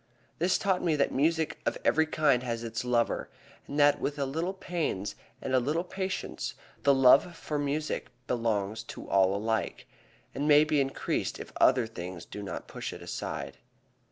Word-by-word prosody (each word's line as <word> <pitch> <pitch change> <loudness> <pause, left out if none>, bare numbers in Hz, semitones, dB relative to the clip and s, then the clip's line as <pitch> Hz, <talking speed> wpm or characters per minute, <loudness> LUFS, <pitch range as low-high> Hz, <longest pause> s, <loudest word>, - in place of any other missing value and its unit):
This 175 +3 +3
taught 190 -2 +1
me 165 -3 +2
that 140 - +2
music 160 +3 +1
of - - -1
every 160 0 +4
kind 145 -5 +3
has 120 -2 -3
its 115 0 -3
lover, 120 -1 +1 0.4
and 145 - -3
that 145 0 +5
with 145 - -2
a 140 - 0
little 165 +8 -2
pains 165 - -2 0.3
and 130 - -2
a 130 - +6
little 150 +7 0
patience 190 +1 -4 0.3
the 140 - +5
love 135 +6 +6
for 150 -1 -3
music 145 +2 -2 0.2
belongs 110 -4 -1
to - - -9
all 95 0 +3
alike, 110 +1 -1 0.5
and 140 +3 -2
may 150 0 +7
be 155 -2 +2
increased 135 0 -2
if - - -9
other 125 -2 +5
things 90 -5 -7
do 105 - -8
not 100 - -6
push - - -5
it - - -9
aside. - - -5
140 Hz, 175 wpm, -29 LUFS, 115-155 Hz, 0.5 s, may